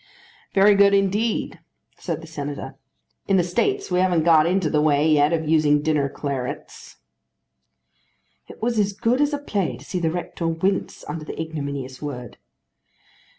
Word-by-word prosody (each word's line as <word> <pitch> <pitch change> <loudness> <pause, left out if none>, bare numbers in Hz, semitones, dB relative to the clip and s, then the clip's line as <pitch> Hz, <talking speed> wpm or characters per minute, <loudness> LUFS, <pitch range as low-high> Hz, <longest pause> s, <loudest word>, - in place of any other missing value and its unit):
"Very 200 +1 +6
good 200 0 +5
indeed," 200 +3 0 0.4
said 165 -3 -4
the - - -10
Senator. 145 -3 -6 0.5
"In 195 - +3
the 180 - +3
States 395 - -1
we 180 - +2
haven't 180 -3 +2
got 160 -1 +5
into 185 -1 +1
the 150 0 +1
way 150 0 +3
yet 150 -1 +4
of 160 -2 -1
using 150 -2 +3
dinner 150 -3 +1
clarets." 135 -3 -6 1.5
It - - -13
was 235 -1 +1
as 205 -1 +1
good 230 +6 +1
as 290 0 +2
a 290 - -1
play 210 -10 -2
to - - -14
see 180 - -3
the 165 -2 +1
rector 170 0 -4
wince 185 +4 -1
under 155 +1 -5
the - - -8
ignominious 140 -5 -5
word. 125 -5 -6
165 Hz, 160 wpm, -23 LUFS, 150-195 Hz, 1.5 s, Very